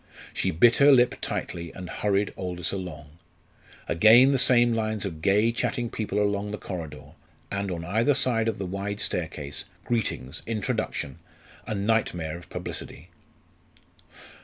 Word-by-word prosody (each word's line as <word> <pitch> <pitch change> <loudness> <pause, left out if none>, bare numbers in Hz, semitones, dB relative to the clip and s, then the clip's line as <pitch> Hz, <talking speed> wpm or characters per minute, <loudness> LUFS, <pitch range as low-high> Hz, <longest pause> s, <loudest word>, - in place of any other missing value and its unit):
She 95 - 0
bit 105 +8 +5
her 145 +1 +7
lip 125 -2 +5
tightly 85 -1 -4
and 90 -1 -8
hurried 100 +2 0
Aldous 90 -2 -3
along. 80 -6 -6 0.8
Again 115 +9 +7
the 135 - +2
same 120 -2 +4
lines 110 -2 -1
of 80 -5 -5
gay, 105 +6 +3
chatting 120 0 -2
people 105 -2 -2
along 100 0 0
the 105 - -4
corridor, 80 -7 -7 0.4
and 100 0 -2
on 85 -2 -4
either 115 +10 +2
side 115 -4 +2
of 115 - -1
the 95 - -4
wide 100 +2 -4
staircase 75 -7 -3 0.2
greetings, 90 - -2
introduction 110 - -2 0.5
a 110 - -2
nightmare 100 -6 0
of 85 - -11
publicity. 85 +6 -6
100 Hz, 140 wpm, -26 LUFS, 90-115 Hz, 0.8 s, her